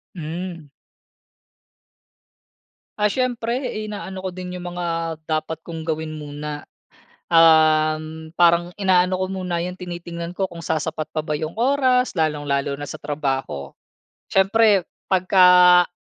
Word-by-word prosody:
Hmm. 170 0 -6 2.3
Ah, 210 -1 +2
siyempre 245 0 -1 0.2
inaano 190 -2 -7
ko 185 - -3
din 180 0 -6
'yong 175 0 -7
mga 175 0 -4 0.4
dapat 155 +1 -2
kong 165 -1 -7
gawin 155 -1 -3
muna, 150 0 -7 0.6
um, 155 -1 +3
parang 175 0 +4
inaano 185 -2 +3
ko 185 - -1
muna, 180 -2 -3
'yong 180 - -4
tinitingnan 170 -1 -6
ko 195 - +1
kung 170 -2 -9
sasapat 155 -1 -3
pa 155 -1 -4
ba 150 - -2
'yong 155 +5 -4
oras 255 0 +2
lalong-lalo 145 -4 -1
na 145 - -6
sa - - -8
trabaho. 135 - -3 0.6
Siyempre 200 -1 +4 0.2
'pagka 180 -1 +6
170 Hz, 120 wpm, -22 LUFS, 155-185 Hz, 2.3 s, pagka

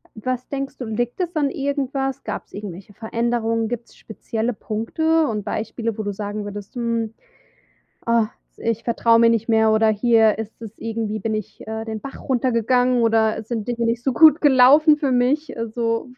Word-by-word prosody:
was 255 +3 -4
denkst 275 -1 -4
du, 250 - -4
liegt 240 - -3
das 350 -1 -2
an 285 -2 +1
irgendwas? 270 -1 -2
Gab's - - -6
irgendwelche 200 0 -8
Veränderungen? 230 0 -1
Gibt's 240 -1 -6
spezielle 225 +1 -4
Punkte 310 - 0
und 210 -2 -3
Beispiele, 225 +1 -3
wo 215 - -3
du 205 - -2
sagen 205 +1 -5
würdest: 205 +2 -8
„Hm, 230 -2 -2 0.9
ah, 230 -2 +3 0.3
ich 230 -1 -2
vertraue 230 -1 +3
mir 230 0 +6
nicht 230 0 0
mehr 220 -1 +4
oder 220 0 +3
hier 220 0 +3
ist 220 +1 -7
es 220 -2 -8
irgendwie 220 -2 -3
bin 220 +1 -2
ich, 215 0 -6
äh, 220 0 -4
den 220 -1 -5
Bach 275 - -8
runtergegangen 250 0 +2
oder 225 -1 +2
es 220 - -9
sind 230 -1 -3
Dinge 235 -1 -1
nicht 230 +1 -1
so 265 - 0
gut 315 +3 +6
gelaufen 290 +3 +6
für 275 -3 0
mich.” 260 +4 +1
Also 230 +1 -2
230 Hz, 180 wpm, -21 LUFS, 220-255 Hz, 0.9 s, mir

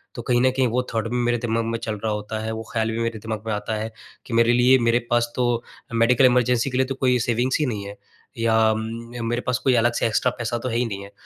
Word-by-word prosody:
तो 120 - -5
कहीं 120 +1 +1
न 130 - +4
कहीं 130 0 +1
वो 125 +3 +1
थॉट 115 0 -1
भी 120 - -3
मेरे 120 0 +2
दिमाग 115 0 -1
में 115 0 -2
चल 110 - -3
रहा 110 - 0
होता 105 +1 -4
है, 110 - -3
वो 110 0 -5
ख़्याल 115 0 0
भी 115 - -3
मेरे 115 -1 -2
दिमाग 110 0 -5
में - - -1
आता 105 +1 -3
है 110 +1 -4 0.3
कि 125 - -7
मेरे 115 +1 +4
लिए 125 +2 +5
मेरे 115 +1 +3
पास 120 0 +1
तो 120 -2 0 0.3
मेडिकल 120 +3 +4
इमरजेंसी 125 0 +3
के 125 - -1
लिए 130 - +3
तो 135 - -3
कोई 125 -2 +2
सेविंग्स 120 +2 +1
ही 150 - +2
नहीं 105 -6 -3
है। 100 0 -8 0.4
या 110 -1 +3
उम, 115 +2 -5
मेरे 120 +1 -1
पास 125 - +1
कोई 130 - +3
अलग 120 0 +3
से - - 0
एक्स्ट्रा 115 +3 +1
पैसा 120 0 -2
तो 125 - -3
है 115 - -3
ही 125 - +1
नहीं 100 -3 -5
है। 100 - -12
115 Hz, 275 wpm, -23 LUFS, 110-125 Hz, 0.4 s, लिए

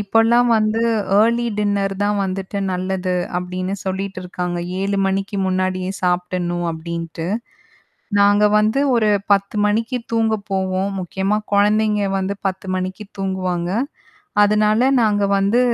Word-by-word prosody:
இப்போலாம் 225 +4 +3
வந்து 215 +1 +1 0.4
early 235 +2 +3
dinner 200 -1 0
தான் 205 0 +1
வந்துட்டு 195 +1 -3
நல்லது 185 0 -2 0.2
அப்பிடின்னு 185 +1 -3
சொல்லிட்டு 190 0 -3
இருக்காங்க. 180 -1 -4 0.2
7:00 200 +1 -1
மணிக்கு 195 +1 -2
முன்னாடியே 185 0 -1
சாப்டுடணும் 180 -1 -1
அப்பிடின்ட்டு. 165 0 -5 0.9
நாங்க 205 +1 +5
வந்து 215 +5 +2 0.2
ஒரு 220 -2 +3 0.2
10:00 200 +1 +2
மணிக்கு 225 +4 0 0.2
தூங்கப் 220 -2 +1
போவோம், 190 0 -1
முக்கியமாக 195 +4 -2
குழந்தைங்க 210 0 +2
வந்து 190 +1 -1
10:00 190 0 -4
மணிக்கு 185 +3 -4
தூங்குவாங்க. 185 -2 -2 0.7
அதனால 215 +3 +3
நாங்க 205 -2 +2
வந்து 200 +5 +2
195 Hz, 120 wpm, -20 LUFS, 185-210 Hz, 0.9 s, நாங்க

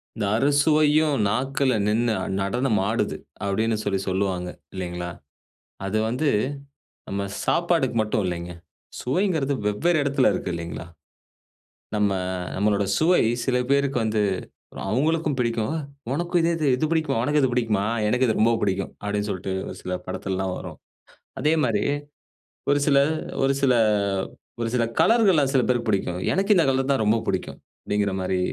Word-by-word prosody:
"இந்த 110 -3 -2
அறுசுவையும் 150 +2 +3
நாக்குல 130 +4 +1
நின்னு 115 +2 +2 0.3
நடனமாடுது" 110 0 0 0.3
அப்படின்னு 110 +3 0
சொல்லி 95 -1 0
சொல்வாங்க 95 -2 -1 0.2
இல்லைங்களா? 90 -2 -4 0.8
அது 105 +3 0
வந்து 130 +6 0 0.8
நம்ம 100 0 -2 0.2
சாப்பாடுக்கு 170 -8 +1
மட்டும் 105 0 -1
இல்லைங்க. 90 0 -4 0.5
சுவைங்குறது 150 -1 0
வெவ்வேறு 155 +12 +2
இடத்துல 140 -2 +3
இருக்கு - - -3
இல்லிங்களா? 85 0 -6 1.1
நம்ம 105 -1 +2 0.4
நம்மளோட 100 0 +1
சுவை 175 +3 +4 0.3
சில 130 -2 +2
பேருக்கு 140 -1 +2
வந்து, 110 -1 +1 0.7
அவங்களுக்கும் 155 +5 +1
பிடிக்கும் 115 +1 0 0.4
"உனக்கும் 175 +4 0
இதே 170 +1 +2
இது 155 - 0
இது 155 - 0
பிடிக்குமா, 160 -5 +1
உனக்கு 150 +2 +2
இது 130 - +3
பிடிக்குமா? 110 -5 +1 0.2
எனக்கு 125 +4 +2
இது 110 - +1
ரொம்ப 115 +2 +4
புடிக்கும்." 95 -1 -1
அப்படின்னு 105 0 -2
சொல்ட்டு 95 0 -3 0.2
ஒரு - - -7
சில 90 - -3
படத்துலலாம் 95 -1 -3
வரும். - - -8 0.6
அதேமாரி, 145 -9 +2 0.9
ஒரு 145 - +3
சில 140 -2 +4 0.5
ஒரு 135 0 +3
சில 130 -2 +5 0.9
ஒரு 115 - -1
சில 125 -2 +2 0.2
கலர்களலா 210 -9 +5
சில 135 - +4
பேருக்கு 120 -2 0
புடிக்கும். 90 -3 0
"எனக்கு 195 +3 +3
இந்த 170 - +4
கலர் 135 0 0
தான் 135 -5 +2
ரொம்ப 110 +2 +3
புடிக்கும்!" 95 -2 -2 0.2
அப்படிங்கிற 105 -1 0
மாரி. 95 0 0
120 Hz, 135 wpm, -24 LUFS, 100-145 Hz, 1.1 s, சில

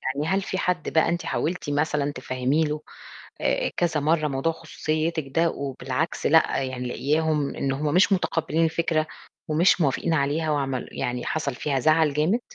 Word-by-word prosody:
يعني 150 +2 -2
هل 190 +3 +1
في 190 - -3
حد 180 -2 -1
بقى 160 +1 +3
أنتِ 175 0 -2
حاولتِ 170 -3 -2
مثلًا 145 0 0
تفهّمي 130 +3 0
له 150 0 -3 0.6
آآ - - +1
كذا 165 -3 +1
مرّة 155 +1 +2
موضوع 140 +4 0
خصوصيتِك 155 -1 -2
ده 170 0 +4
وبالعكس 135 +2 -3
لأ، 160 -3 +4
يعني 130 -1 -4
لاقياهم 150 +2 0
إن 135 -1 -1
هُم 145 +3 -1
مش 190 +2 +5
مُتقبلين 165 -3 +1
الفكرة 160 -1 +1 0.4
ومش 170 +4 +4
موافقين 155 +3 +1
عليها 155 +2 0
وعمل 135 -4 -1
يعني 125 0 -3
حصل 145 -4 -2
فيها 140 0 -1
زَعَل 155 +1 +3
جامد؟ 165 - +2
155 Hz, 165 wpm, -25 LUFS, 140-165 Hz, 0.6 s, مش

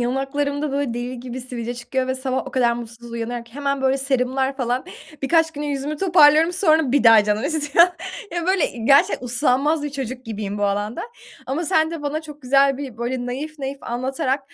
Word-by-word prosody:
yanaklarımda 280 +3 -1
böyle 280 -4 -1
deli 245 0 -5
gibi 255 0 -6
sivilce 245 -1 -5
çıkıyor 255 +2 -2
ve 260 - -1
sabah 260 0 -2
o - - -6
kadar 240 -2 +2
mutsuz 235 0 -8
uyanıyorum 235 +1 -4
ki 235 - -20
hemen 280 -1 -2
böyle 265 +1 +2
serumlar 265 0 0
falan 250 0 -1 0.4
birkaç 325 +3 +3
güne 295 0 -5
yüzümü 285 +1 -3
toparlıyorum. 325 -2 +5
Sonra 320 -7 +3
bir 285 -2 +3
daha 225 -2 +8
canım 210 +1 0
istiyor 315 +2 +4 0.5
ya 345 0 -2
böyle 375 -2 +2
i 230 -2 -7
gerçekten 275 -1 +4
uslanmaz 280 +5 +1
bir 295 - -3
çocuk 260 -2 -5
gibiyim 210 -2 -5
bu 205 - +1
alanda 205 +3 -2 0.4
ama 280 +6 -2
sen 320 -2 +2
de 330 -3 -6
bana 300 +2 -2
çok 300 -1 -12
güzel 275 +1 +3
bir 265 -6 -7
böyle 245 +1 -3
naif 295 +5 -5
naif 275 0 -4
anlatarak 260 +2 -2
265 Hz, 195 wpm, -22 LUFS, 245-290 Hz, 0.5 s, daha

